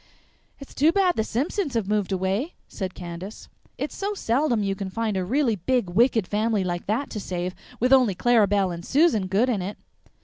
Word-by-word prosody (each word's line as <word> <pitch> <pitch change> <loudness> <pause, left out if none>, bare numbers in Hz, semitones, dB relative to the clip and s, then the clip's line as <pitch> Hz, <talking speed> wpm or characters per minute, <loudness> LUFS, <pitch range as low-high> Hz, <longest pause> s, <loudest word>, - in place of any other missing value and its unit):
"It's 275 - -12
too 305 +4 +4
bad 370 -1 +2
the 220 - +1
Simpsons 280 - -2
have 220 -4 0
moved 205 -2 0
away," 190 - -1
said 190 -2 -5
Candace. 175 +4 -8 0.3
"It's - - -4
so 405 +1 -3
seldom 240 - +1
you 195 -1 0
can 195 -1 -5
find 220 +1 -2
a 190 - 0
real 245 +3 +1
big 245 -9 +1
wicked 225 0 +3
family 215 -1 0
like 175 -1 -3
that 225 +8 -1
to 215 - -4
save, 180 -2 -3 0.3
with 250 +3 +3
only 250 -8 +5
Clara 230 0 +4
Belle 195 -2 +1
and 170 0 -6
Susan 265 - +2
good 200 +7 +2
in 225 -7 0
it." 195 +3 -5
215 Hz, 200 wpm, -25 LUFS, 190-255 Hz, 0.3 s, only